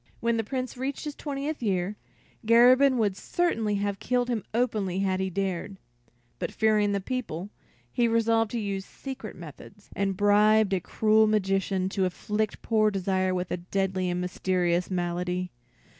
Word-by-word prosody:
When 235 0 +1
the 225 - 0
Prince 255 +2 -4
reached 265 +2 -3
his 295 - -4
twentieth 285 +1 -4
year, 195 -2 -1 0.5
Garabin 250 +4 +6
would 205 -4 +1
certainly 225 - 0
have 200 -1 -2
killed 250 0 0
him 230 -5 -1
openly 215 -6 0
had 190 -1 0
he 190 0 -1
dared; 190 +1 -3 0.6
but, - - -3
fearing 215 -2 +2
the 200 - 0
people, 200 -5 -4 0.4
he 240 - +2
resolved 225 -1 +2
to 235 - -3
use 200 -2 -3
secret 260 -1 -8
methods, 175 +5 -12
and 195 -1 -1
bribed 210 0 +4
a 190 - +2
cruel 215 +4 +3
magician 195 -2 +1
to 195 -1 0
afflict 210 +3 -2
poor 215 -2 +3
Desire 185 -1 0
with 180 0 -3
a - - 0
deadly 185 +1 -1
and 175 0 -1
mysterious 180 -1 0
malady. 180 0 -2
205 Hz, 160 wpm, -27 LUFS, 185-230 Hz, 0.6 s, Garabin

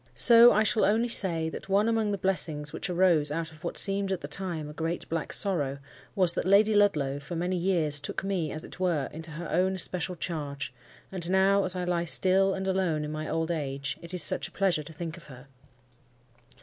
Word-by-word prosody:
So 235 0 +8
I 215 - +2
shall 215 0 +1
only 225 +4 +1
say, 170 -7 +3
that 160 - -9
one 200 +3 +2
among 225 -2 0
the 200 - -2
blessings 160 -6 0
which - - -5
arose 170 -5 +3
out 165 +1 -4
of 155 +1 -18
what 170 - -5
seemed 195 0 0
at 190 - -3
the 145 - -6
time 165 -1 -2
a 150 - -9
great, 165 +2 -4
black 165 -1 -3
sorrow 145 -9 -1 0.4
was, 185 -3 +3
that - - -3
Lady 205 +3 +4
Ludlow 150 -10 +1
for 155 +5 -8
many 175 +2 -2
years 170 -5 +1
took 145 - -5
me, 185 -6 -2
as 155 - -5
it - - -12
were, 170 -7 -1
into 160 +1 -6
her 165 +2 -7
own 190 +1 +1
especial 180 0 -2
charge; 145 -5 -5 0.4
and 180 -3 -6
now, 195 +1 +3
as 185 0 0
I 180 - -3
lie 175 -1 -1
still 190 +3 +2
and 190 0 -4
alone 180 -5 -1
in 150 - -6
my 155 0 -5
old 165 +1 -2
age, 140 -3 -4
it 170 - -8
is 180 -4 +3
such - - +3
a - - -18
pleasure 190 -5 0
to 150 - -9
think 165 +1 -7
of 170 - -15
her! 130 -2 -13
175 Hz, 220 wpm, -27 LUFS, 155-190 Hz, 0.4 s, So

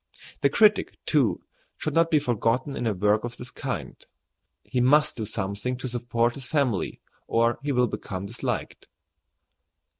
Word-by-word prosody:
The - - +4
critic, 215 -2 +3
too, - - +2 0.3
should - - -3
not 165 0 +4
be 160 - +4
forgotten 125 0 0
in 120 - -2
a 110 - +2
work 105 +3 +2
of 120 0 -5
this 125 +1 -9
kind. - - -4 0.7
He 125 - -1
must 150 +4 +4
do 110 - -3
something 105 +6 -3
to 130 - -4
support 120 -1 0
his 135 0 -7
family, 135 - 0 0.3
or 115 +1 +2
he 145 +1 -1
will 125 -2 +3
become 95 -4 -5
disliked. 115 +4 -4
120 Hz, 155 wpm, -26 LUFS, 115-140 Hz, 0.7 s, The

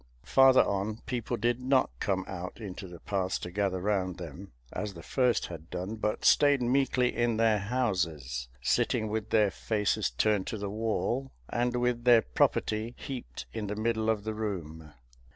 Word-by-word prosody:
Farther 135 -1 +6
on, 100 +3 -2
people 125 -3 -2
did 120 +3 +1
not 130 - +2
come 95 -1 0
out 90 0 -6
into 100 -2 -7
the 85 -1 -11
paths 95 -2 -1
to 90 - -7
gather 95 -1 0
round 95 -2 -1
them, 90 +2 -9 0.2
as 105 -3 -4
the 85 - -10
first 125 +2 +1
had 85 -1 -9
done, 90 +4 -4
but 105 0 -2
stayed 145 -2 +5
meekly 125 0 +2
in 120 -2 +1
their 110 -2 +3
houses, 90 - -1 0.2
sitting 110 +10 +1
with 110 0 -3
their 105 -3 +3
faces 105 0 0
turned 105 -3 +1
to 110 - -3
the 100 -1 -4
wall, 115 +4 -1 0.2
and 120 +1 0
with 120 -1 0
their 120 -2 +7
property 110 - 0
heaped 135 -4 -7
in 110 -2 -3
the 105 - -3
middle 110 0 0
of 110 -2 +1
the 110 0 -3
room. 80 -8 -5
105 Hz, 170 wpm, -29 LUFS, 95-120 Hz, 0.2 s, their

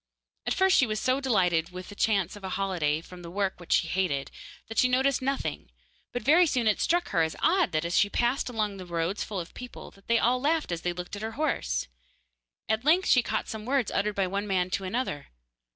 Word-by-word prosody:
At - - +1
first 380 0 +4
she 255 - +4
was 215 -1 -2
so 260 +4 +1
delighted 180 -10 +2
with 180 0 -9
the - - -8
chance 200 -4 +1
of 205 - -12
a 190 - -4
holiday 175 -6 0
from 180 +1 -12
the 170 - -8
work 195 +1 -2
which 175 - -10
she 165 - +3
hated, 170 -8 -1 0.4
that 225 - -2
she 255 - +5
noticed 265 +1 +2
nothing, 270 +1 -2 0.4
but 245 - -4
very 335 +5 +6
soon 250 -5 0
it 215 -1 +2
struck 350 +1 +1
her 165 - +2
as 160 0 0
odd 370 -2 +3
that 155 +1 0
as 170 - +2
she 205 - +3
passed 245 +4 0
along 215 -4 -2
the 185 - -8
roads 170 +3 -1
full 200 -3 -4
of 170 - -7
people 250 0 -9
they 235 - +4
all 250 +2 +2
laughed 310 - +1
as 170 -1 -2
they 175 - -1
looked 180 +2 -6
at 205 - -7
her 220 +1 -4
horse. 220 - -1 0.8
At 220 +1 0
length 340 +6 +3
she 250 - +6
caught 220 -2 -2
some 220 -1 -6
words 255 -1 0
uttered 210 +1 0
by 195 - +1
one 200 +3 -2
man 185 -2 0
to 195 - -1
another. 195 - -3
205 Hz, 230 wpm, -28 LUFS, 180-255 Hz, 0.8 s, very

